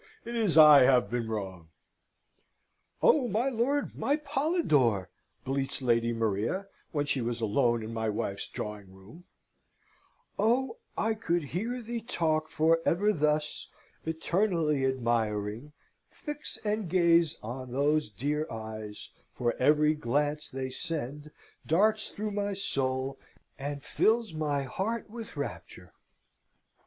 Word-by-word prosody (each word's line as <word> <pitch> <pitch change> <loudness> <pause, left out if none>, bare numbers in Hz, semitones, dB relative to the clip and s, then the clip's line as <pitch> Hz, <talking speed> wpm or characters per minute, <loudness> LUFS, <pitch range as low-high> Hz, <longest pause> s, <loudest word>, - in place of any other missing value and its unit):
It 235 +1 -5
is 215 -8 +2
I 150 -3 +10
have 125 -2 +4
been 120 -2 -2
wrong." 95 -6 -5 1.4
"Oh, 270 -5 +5
my 235 +5 +1
lord, 265 +4 0
my 285 - +1
Polidore!" 270 - +1 0.4
bleats 135 0 -1
Lady 115 -1 +2
Maria, 115 - -1 0.3
when 145 -3 0
she 140 -2 0
was 120 0 -2
alone 115 +1 +1
in 110 +1 -6
my 110 -1 -1
wife's 100 -2 -3
drawing 105 -3 -6
room: 100 - -15 1.1
"'Oh, 250 - +2 0.2
I 220 0 +1
could 175 -6 -1
hear 225 - -3
thee 235 +1 -4
talk 160 -9 0
for 160 +2 +3
ever 205 +5 +2
thus, 150 -1 0 0.4
Eternally 160 -3 +1
admiring, 115 0 -1 0.4
fix 295 -2 -7
and 210 -3 -1
gaze 170 -2 +4
On 125 +3 -6
those 145 +1 +1
dear 145 +9 -2
eyes, 110 -1 -7 0.2
for 120 -1 0
every 150 +3 +4
glance 150 +2 -1
they 130 0 -4
send 150 -1 -4 0.4
Darts 215 +6 +2
through 210 +1 -4
my 205 0 -1
soul, 135 -7 -2 0.4
and 145 0 -4
fills 225 -4 +1
my 150 -3 -1
heart 205 - -3
with 230 -1 -8
rapture!' - - -6
150 Hz, 125 wpm, -29 LUFS, -, 1.4 s, I